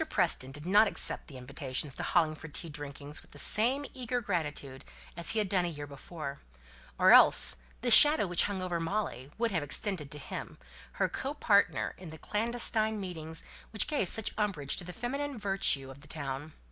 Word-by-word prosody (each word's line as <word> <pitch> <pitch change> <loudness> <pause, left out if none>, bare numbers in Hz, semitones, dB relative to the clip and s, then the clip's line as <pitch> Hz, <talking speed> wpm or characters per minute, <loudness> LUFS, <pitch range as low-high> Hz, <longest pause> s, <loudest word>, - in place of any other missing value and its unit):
Preston 170 - 0
did 150 +3 -8
not 205 +4 +5
accept - - +1
the 140 - -11
invitations 135 +2 -3
to - - -6
Hollingford 160 -2 -1
tea 170 - -3
drinkings 145 0 -7
with - - -21
the - - -15
same 245 - +2
eager 250 -1 -3
gratitude 150 - -4 0.3
as 170 0 +1
he 225 - +2
had 210 -2 0
done 185 -1 +1
a - - -1
year 145 -3 -6
before: 145 0 -8 0.6
or - - +5
else - - +8 0.2
the - - -1
shadow 295 -6 +8
which 175 -2 +2
hung 195 -2 -4
over 175 -2 -3
Molly 165 - -4
would 230 0 -1
have 170 -4 -1
extended 150 +1 -1
to 150 - -5
him, - - -8 0.4
her - - 0
co 275 +2 -5
partner 200 -8 +1
in 180 -3 -10
the 160 - -10
clandestine 220 +1 0
meetings 160 -4 -7 0.3
which 215 - +2
gave 290 - -1
such 220 - +2
umbrage 180 -10 -1
to - - -2
the 180 - -8
feminine 275 - -5
virtue 195 -10 -1
of 135 +1 -14
the 145 - -14
town. 145 0 -6
175 Hz, 190 wpm, -30 LUFS, 145-215 Hz, 0.6 s, else